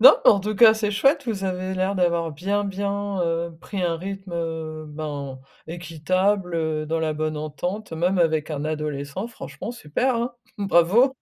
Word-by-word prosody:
Non 245 - +10
mais - - +10
en 200 - +4
tout 210 +2 -2
cas, 220 +2 +8
c'est 215 -1 0
chouette. 270 +7 +3
Vous 200 -4 -2
avez 185 0 -2
l'air 185 +2 0
d'avoir 170 -3 +1
bien, 200 +7 -1
bien, 200 0 -2
heu, 165 0 -1
pris 195 -3 -4
un 170 -1 +1
rythme, 195 +1 -6
heu, 160 -2 -4
ben, 145 -3 -5 0.3
équitable, 180 +3 0
heu, 155 -2 -1
dans 165 +1 0
la 155 -1 0
bonne 155 0 -2
entente 170 +7 -4
même 180 +3 +1
avec 160 -2 +2
un 145 -1 -3
adolescent. 150 +4 -3
Franchement, 230 0 -7
super, 245 - 0
hein. 240 +2 -1 0.3
Bravo! 200 +8 +4
175 Hz, 175 wpm, -24 LUFS, 155-200 Hz, 0.3 s, Non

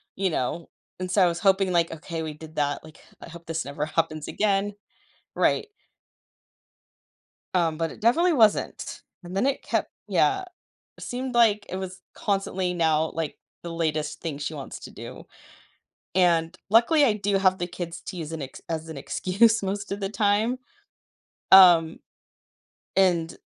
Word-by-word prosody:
You 190 -1 0
know? 155 +5 -2 0.3
And 185 0 -4
so 190 0 +4
I - - +5
was 170 0 -2
hoping, 195 -1 +3
like, 170 -1 +2
"Okay, 165 0 -5
we 155 - -5
did 155 +1 -12
that, 145 -1 0
like, 155 -1 -14 0.2
I - - -10
hope 170 0 -12
this 165 0 -2
never 145 +2 -3
happens 155 -1 -1
again." 205 -1 0 0.6
Right. - - +2 1.9
Um, 165 -3 +2
but 165 -1 -1
it - - -14
definitely 325 +10 +3
wasn't, 220 -5 +1 0.2
and 175 +2 -7
then 250 - +2
it 275 - 0
kept - - -1 0.2
yeah, 390 -1 +2 0.5
seemed, 250 0 -5
like, 215 -3 +4
it 185 - -3
was 190 0 -6
constantly 190 -3 -1
now, 160 -2 +2
like, 160 -2 -3 0.2
the 170 - -6
latest 155 -2 -2
thing 160 -4 -4
she 145 +2 -4
wants 140 -2 -7
to - - -10
do, - - -10 0.9
and 170 -2 +3
luckily, 240 +9 +5
I 230 - +3
do 200 -1 0
have 190 -1 +3
the 175 - -3
kids 175 -1 -6
to 185 - -7
use 160 -2 -5
as - - -6
an 160 - -5
ex 130 - -9
as 160 -1 -3
an 160 - -7
excuse 205 +10 +2
most 200 +1 -3
of 200 - -3
the 195 -1 -2
time. 215 +3 +1 1.0
Um, 175 -4 +8 1.0
and, 175 -4 +2
180 Hz, 165 wpm, -25 LUFS, 160-200 Hz, 1.9 s, Um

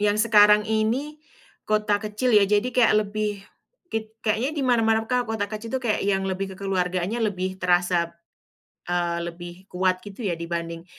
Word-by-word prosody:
yang 205 0 +2
sekarang 210 -1 +5
ini, 240 +8 -1 0.5
kota 210 -1 +1
kecil, 215 +3 0
ya, 205 -1 +7
jadi 210 +2 +2
kayak 245 -3 +5
lebih, 205 -1 -3 0.5
kit 220 -1 -3
kayaknya 225 +5 +1
di - - 0
mana-mana 225 -2 +3
Kak, 250 -2 0
kota 210 -2 -1
kecil 215 +2 -7
itu 260 - 0
kayak 235 -4 -1
yang 195 -1 0
lebih 190 0 -3
kekeluargaannya 185 +2 -1
lebih 185 -3 -2
terasa, 175 -1 +2 0.7
eee, 175 -1 -1
lebih 175 +2 -8
kuat, 185 0 +1
gitu, 205 +2 -7
ya, 170 - 0
dibanding 170 0 -5
205 Hz, 160 wpm, -24 LUFS, 185-220 Hz, 0.7 s, ya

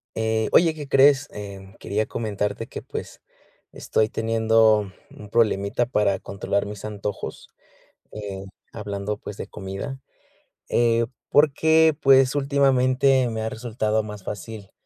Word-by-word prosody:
Eh, 110 0 0
oye, 165 -2 +5
¿qué 150 -2 -8
crees? 135 +1 +5
Eh, 100 -2 -9
quería 105 +2 -1
comentarte 105 -2 -3
que, - - -8
pues, - - -8 0.5
estoy 110 0 0
teniendo 110 -2 +2 0.2
un 105 -1 -12
problemita 110 0 +1
para 105 -5 +1
controlar 100 +1 -2
mis 105 -1 -8
antojos. 105 -1 -6 0.6
Eh, 100 -2 -7 0.3
hablando, 105 -1 -4
pues, 105 - -9
de - - -6
comida, 100 +7 -6 0.7
eh, 115 -1 +2 0.2
porque, 160 +2 +4
pues 135 0 +5
últimamente 135 -2 +3
me 110 -1 -4
ha 110 - -2
resultado 110 -2 -1
más 105 -2 -9
fácil, 105 0 -7
110 Hz, 125 wpm, -23 LUFS, 105-130 Hz, 0.7 s, oye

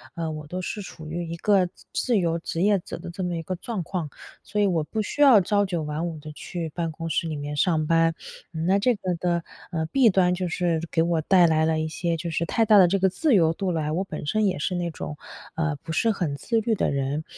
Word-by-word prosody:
呃， 165 -1 -3
我 155 -1 -7
都 180 +4 -4
是 195 +3 -4
处 160 -4 -10
于 170 +1 -4
一 - - -3
个 190 0 +3 0.2
自 240 -3 +1
由 170 -3 +1
职 165 +1 -2
业 205 -1 +4
者 - - -8
的 170 +1 -8
这 185 +2 -5
么 175 -1 -2
一 165 - -4
个 185 +3 -3
状 205 0 -4
况， 170 -2 -4 0.3
所 210 - -4
以 205 - +4
我 170 -5 +1
不 215 +8 -3
需 290 - -4
要 265 -7 +8
朝 205 +2 +2
9 175 -4 -2
晚 150 +3 -3
5 165 -2 -5
地 155 0 -9
去 165 +2 -5
办 165 +1 -3
公 165 +1 -6
室 165 +1 0
里 155 - -3
面 145 0 -5
上 155 -1 +2
班。 165 +1 +3 0.4
嗯， 160 0 -3
那 190 +3 +3
这 245 +4 +2
个 185 -3 -2
的， 170 0 -1 0.3
呃， 160 -2 -1
弊 260 +4 +4
端 185 -2 +3
就 180 0 -2
是 170 -1 0
给 165 - +2
我 165 -1 +1
带 180 +2 +5
来 160 -1 +3
了 160 0 +1
一 155 - -1
些 170 +1 -2
就 170 +1 -4
是 160 - 0
太 225 +6 +1
大 210 -1 +7
的 185 - +7
这 195 +3 +2
个 190 0 +3
自 235 - +2
由 165 -4 +4
度 185 +2 -2
来， 155 -3 -1
我 175 +5 0
本 155 -5 -7
身 215 +7 +1
也 185 - 0
是 155 +6 -2
那 175 -1 -1
种， 155 -2 -6 0.4
呃， 160 -2 -1
不 160 - -6
是 200 +8 +2
很 175 -9 -1
自 225 - 0
律 225 +1 0
的 215 - +1
人。 140 +2 -1
170 Hz, 275 characters per minute, -25 LUFS, 160-190 Hz, 0.4 s, 要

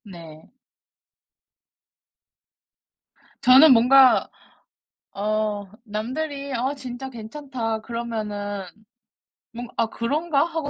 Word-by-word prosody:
네. 165 -6 -13 2.9
저는 265 +3 +8
뭔가 255 +2 +5 0.8
어 210 -1 -2
남들이 275 +6 -5
"아 260 +3 -1
진짜 260 -1 -7
괜찮다." 235 -1 -5
그러면은 210 -4 -5 0.9
뭔가 240 +1 -8
'아 - - +2
그런가?' 290 +6 0
하고 320 -3 -4
240 Hz, 150 characters per minute, -23 LUFS, 215-275 Hz, 2.9 s, 저는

